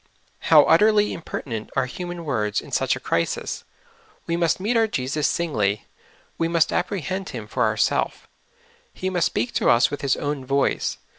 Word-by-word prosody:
How -, -, +8 dB
utterly 210 Hz, -1 st, +4 dB
imper 165 Hz, -, -6 dB
tinent 110 Hz, -5 st, -5 dB
are -, -, +2 dB
human 175 Hz, +5 st, -6 dB
words 105 Hz, -8 st, 0 dB
in -, -, -11 dB
such -, -, +1 dB
a -, -, -6 dB
crisis! -, -, -2 dB, 0.6 s
We 170 Hz, -, -1 dB
must 170 Hz, 0 st, +1 dB
meet 215 Hz, +6 st, 0 dB
our 225 Hz, -1 st, +4 dB
Jesus 145 Hz, -4 st, -1 dB
singly; 105 Hz, -12 st, 0 dB, 0.5 s
we 165 Hz, -, +2 dB
must 165 Hz, -1 st, +2 dB
apprehend 190 Hz, +1 st, -2 dB
Him 115 Hz, -5 st, -6 dB
for 125 Hz, +3 st, 0 dB
ourself; 110 Hz, 0 st, 0 dB, 0.7 s
He 185 Hz, 0 st, -3 dB
must 175 Hz, -2 st, +2 dB
speak 120 Hz, -, -2 dB
to -, -, +2 dB
us 120 Hz, +4 st, +4 dB
with 145 Hz, -, -4 dB
His 140 Hz, -2 st, +1 dB
own 145 Hz, -2 st, -3 dB
voice. 140 Hz, +2 st, 0 dB
150 Hz, 170 wpm, -23 LUFS, 125-180 Hz, 0.7 s, How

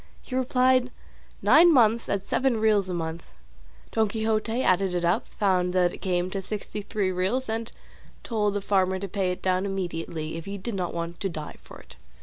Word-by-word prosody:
He -, -, -10 dB
replied, 255 Hz, 0 st, +3 dB, 0.5 s
nine 340 Hz, +2 st, +7 dB
months 235 Hz, -5 st, +4 dB
at 200 Hz, -1 st, -1 dB
seven 260 Hz, -4 st, +1 dB
reals 210 Hz, -3 st, +2 dB
a -, -, -2 dB
month. 165 Hz, 0 st, -5 dB, 0.6 s
Don 220 Hz, -1 st, +2 dB
Quixote 220 Hz, +3 st, -1 dB
added 185 Hz, 0 st, +2 dB
it 175 Hz, -1 st, 0 dB
up, 170 Hz, -, +1 dB
found 180 Hz, -3 st, 0 dB
that 180 Hz, -1 st, +2 dB
it -, -, -8 dB
came 180 Hz, -1 st, -1 dB
to 195 Hz, -, -3 dB
sixty 210 Hz, +1 st, -5 dB
three 200 Hz, -2 st, -1 dB
reals, 190 Hz, +9 st, -1 dB
and 225 Hz, +1 st, -3 dB, 0.5 s
told 210 Hz, -3 st, 0 dB
the 205 Hz, -, -1 dB
farmer 190 Hz, -1 st, +1 dB
to 200 Hz, +1 st, -4 dB
pay 190 Hz, -1 st, -1 dB
it 180 Hz, -, -6 dB
down 185 Hz, 0 st, +1 dB
immediately, 165 Hz, -5 st, -4 dB
if 165 Hz, -, -7 dB
he 200 Hz, 0 st, -5 dB
did 210 Hz, +4 st, -5 dB
not 180 Hz, -3 st, -3 dB
want 170 Hz, 0 st, -4 dB
to 195 Hz, -, -2 dB
die 155 Hz, -3 st, -7 dB
for -, -, -13 dB
it. -, -, -16 dB
195 Hz, 195 wpm, -26 LUFS, 180-220 Hz, 0.6 s, nine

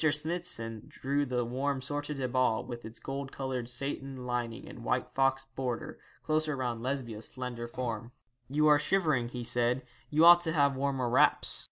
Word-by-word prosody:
Smithson 150 Hz, -8 st, -2 dB
drew 140 Hz, +1 st, -1 dB
the 125 Hz, -1 st, 0 dB
warm 135 Hz, +3 st, -1 dB
sortie 145 Hz, +2 st, -3 dB
de 135 Hz, -2 st, -1 dB
bal, 125 Hz, -2 st, +1 dB
with 120 Hz, -1 st, -7 dB
its 110 Hz, +1 st, -8 dB
gold 135 Hz, 0 st, -5 dB
coloured 130 Hz, -3 st, -3 dB
satin 135 Hz, 0 st, -3 dB
lining 120 Hz, -2 st, -3 dB
and -, -, -10 dB
white -, -, -1 dB
fox 135 Hz, 0 st, +2 dB
border, 130 Hz, -3 st, -4 dB, 0.2 s
closer 155 Hz, -1 st, +1 dB
round 120 Hz, -3 st, -2 dB
Lesbia's 120 Hz, -4 st, -3 dB
slender 125 Hz, -2 st, -5 dB
form. 120 Hz, -1 st, -4 dB, 0.4 s
'You 150 Hz, +3 st, +2 dB
are 150 Hz, -1 st, +7 dB
shivering,' 150 Hz, -9 st, +1 dB
he 125 Hz, 0 st, -5 dB
said; 120 Hz, +2 st, +1 dB, 0.3 s
'you 155 Hz, +2 st, +5 dB
ought 175 Hz, 0 st, +10 dB
to 165 Hz, -2 st, -1 dB
have 140 Hz, -3 st, +3 dB
warmer 135 Hz, -2 st, 0 dB
wraps. 120 Hz, -, +3 dB
130 Hz, 170 wpm, -31 LUFS, 120-140 Hz, 0.4 s, ought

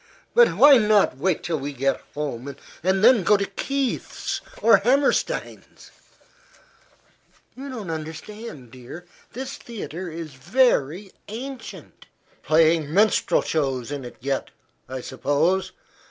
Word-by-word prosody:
"But 485 Hz, 0 st, +5 dB
why 285 Hz, -3 st, +8 dB
not 210 Hz, -, +3 dB
wait 185 Hz, +5 st, 0 dB
till 165 Hz, -3 st, -2 dB
we 140 Hz, +1 st, -5 dB
get 135 Hz, +1 st, 0 dB
home, 140 Hz, -2 st, -4 dB, 0.3 s
and 190 Hz, +3 st, +1 dB
then 240 Hz, -2 st, +7 dB
go 205 Hz, +4 st, +4 dB
to 200 Hz, -, -1 dB
Kieth's 270 Hz, +7 st, -3 dB, 0.2 s
or 230 Hz, -2 st, +6 dB
Hammerstein's?" 275 Hz, -, -1 dB, 1.6 s
"You 275 Hz, +2 st, -8 dB
don't 220 Hz, -10 st, -6 dB
understand, 160 Hz, -, -8 dB
dear. 130 Hz, +8 st, -11 dB, 0.3 s
This 260 Hz, +2 st, -6 dB
theatre 185 Hz, -6 st, -7 dB
is 160 Hz, -2 st, -7 dB
very 180 Hz, -, +1 dB, 0.2 s
ancient." 245 Hz, +2 st, -9 dB, 0.3 s
"Playing 160 Hz, -1 st, +3 dB
minstrel 210 Hz, +5 st, +3 dB
shows 135 Hz, -5 st, -2 dB
in 140 Hz, -2 st, -4 dB
it 120 Hz, -, -9 dB
yet, 135 Hz, +1 st, -2 dB, 0.4 s
I 130 Hz, 0 st, -5 dB
suppose. 145 Hz, +9 st, 0 dB
175 Hz, 120 wpm, -23 LUFS, 145-225 Hz, 1.6 s, why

